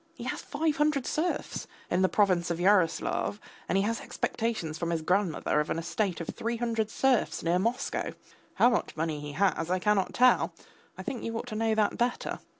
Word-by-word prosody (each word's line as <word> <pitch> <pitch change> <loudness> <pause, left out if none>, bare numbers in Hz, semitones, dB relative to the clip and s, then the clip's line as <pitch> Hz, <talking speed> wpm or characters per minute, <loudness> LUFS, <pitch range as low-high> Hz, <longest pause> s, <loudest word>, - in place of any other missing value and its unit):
He - - -8
has - - -3
five 315 -2 -1
hundred 295 -3 +2
serfs 340 +3 -2 0.2
in 180 - +2
the 185 - +4
province 185 -5 +2
of 170 -1 -2
Yaroslav, 185 +1 +2 0.3
and 190 - +2
he 195 - +3
has 230 +2 -1
expectations 205 -9 -2
from 170 - -1
his 165 -2 -1
grandmother 180 -4 +1
of 150 - -1
an - - -1
estate 175 +2 -1
of 170 - -5
three 230 +1 -3
hundred 225 -2 -1
serfs 260 0 +1
near 170 +2 +2
Moscow. 230 +6 -1 0.4
How 245 - +5
much 235 - -1
money 155 -1 -1
he 145 0 -6
has 170 -1 +1
I 185 - +2
cannot 195 0 +1
tell; 255 0 +4 0.4
I - - -6
think 250 - -4
you 230 0 -3
ought - - -4
to 215 - -5
know 220 0 +1
that 215 -1 +1
better. 245 +1 -1
205 Hz, 200 wpm, -29 LUFS, 170-230 Hz, 0.4 s, How